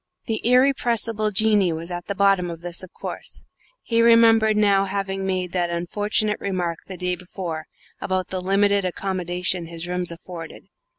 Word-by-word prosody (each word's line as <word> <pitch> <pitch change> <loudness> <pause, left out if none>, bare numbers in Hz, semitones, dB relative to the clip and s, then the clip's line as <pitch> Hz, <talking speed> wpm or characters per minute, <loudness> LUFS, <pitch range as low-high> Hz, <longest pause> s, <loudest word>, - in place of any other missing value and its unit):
The 225 -2 -2
irrepressible 235 -4 +2
Jinnee 210 -4 +3
was 165 +2 -6
at 175 0 -5
the 200 - -2
bottom 195 -3 +3
of 165 -1 -7
this, 175 0 -3
of 185 - -10
course. - - -7 0.4
He 230 -1 +2
remembered 225 -2 +5
now 200 -2 +4
having 195 0 -3
made 185 -2 -1
that 175 -1 0
unfortunate 205 +5 -1
remark 180 -4 -2
the 190 - -7
day 180 0 -1
before 175 -3 -6 0.3
about 185 -1 -1
the 185 -1 -3
limited 200 +1 +2
accommodation 180 -1 -2
his 170 +1 -6
rooms 180 -1 0
afforded. 170 -1 -9
190 Hz, 160 wpm, -23 LUFS, 175-210 Hz, 0.4 s, remembered